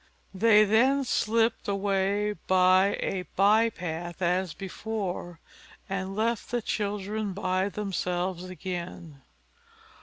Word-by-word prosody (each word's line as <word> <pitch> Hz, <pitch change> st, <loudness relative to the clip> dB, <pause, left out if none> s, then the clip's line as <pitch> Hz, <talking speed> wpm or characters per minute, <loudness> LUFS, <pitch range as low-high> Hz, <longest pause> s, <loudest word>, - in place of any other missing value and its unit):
They 210 Hz, +2 st, +5 dB
then 255 Hz, +7 st, +3 dB
slipped 225 Hz, -1 st, +1 dB
away 200 Hz, +1 st, 0 dB
by 185 Hz, +2 st, +4 dB
a 185 Hz, -3 st, -2 dB
by 215 Hz, +4 st, +5 dB
path 175 Hz, -3 st, -6 dB
as 180 Hz, 0 st, 0 dB
before, 190 Hz, -3 st, -5 dB, 0.5 s
and 195 Hz, 0 st, -3 dB
left 225 Hz, +1 st, -1 dB
the 240 Hz, -, 0 dB
children 205 Hz, 0 st, -2 dB
by 185 Hz, 0 st, 0 dB
themselves 185 Hz, -3 st, -2 dB
again. 175 Hz, -5 st, -7 dB
195 Hz, 100 wpm, -27 LUFS, 185-210 Hz, 0.5 s, They